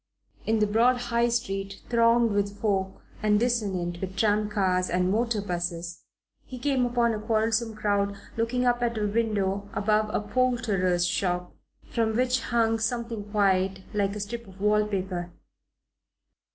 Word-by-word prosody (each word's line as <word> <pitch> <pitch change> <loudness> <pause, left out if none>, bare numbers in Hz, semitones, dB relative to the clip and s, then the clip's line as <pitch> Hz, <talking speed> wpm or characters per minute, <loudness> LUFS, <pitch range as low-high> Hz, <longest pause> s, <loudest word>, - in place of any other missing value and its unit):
In 220 0 +3
the 215 - +3
broad 230 +4 +3
High 240 -1 +1
Street, 195 -5 -3
thronged 230 -1 +4
with 200 0 -1
folk, 190 -3 -1 0.2
and 210 -1 +3
dissonant 195 -8 -1
with 190 0 -5
tram 210 0 +2
cars 185 -3 +1
and 180 +1 +1
motor 225 -1 0
'buses, 175 -2 -4 0.4
he 255 - -9
came 260 -1 +1
upon 240 -1 +1
a 215 - -3
quarrelsome 220 +1 0
crowd 200 -1 0 0.2
looking 235 +2 0
up 245 0 +2
at 235 -1 0
a 210 - 0
window 205 -2 0
above 215 +1 +1
a - - 0
poulterer's 210 -7 +1
shop, 180 -1 -1 0.3
from 225 -2 -1
which 250 +1 +2
hung 225 -1 +1
something 230 -2 -3
white, 190 -2 +1
like 200 -1 0
a - - -4
strip 230 +3 -5
of 190 0 -15
wall 210 +1 +2
paper. 185 -3 -3
210 Hz, 150 wpm, -27 LUFS, 195-235 Hz, 0.4 s, thronged